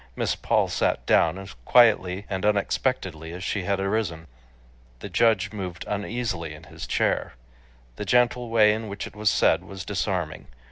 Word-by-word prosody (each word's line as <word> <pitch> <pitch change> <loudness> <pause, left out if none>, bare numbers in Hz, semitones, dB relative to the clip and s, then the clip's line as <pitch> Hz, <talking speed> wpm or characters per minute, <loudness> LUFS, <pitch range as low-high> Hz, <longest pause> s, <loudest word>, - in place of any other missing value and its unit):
Miss - - 0
Paul - - +1
sat - - 0
down 85 +2 +3
as 95 0 -9
quietly 100 - +4
and 95 -2 -3
unexpectedly 100 - -1
as 90 +2 -7
she 95 -1 -2
had 100 0 0
arisen. 95 -5 -1 0.7
The - - -8
judge 110 -4 +2
moved 90 -4 -6
uneasily 100 -6 -3
in 75 - -14
his 80 +1 -9
chair. - - 0 0.6
The 105 - -4
gentle 125 +2 +2
way 110 -2 +5
in 110 +1 -4
which 100 0 -5
it - - -11
was 105 0 +2
said - - +3
was 95 -2 -8
disarming. 90 -5 -3
100 Hz, 160 wpm, -25 LUFS, 90-110 Hz, 0.7 s, way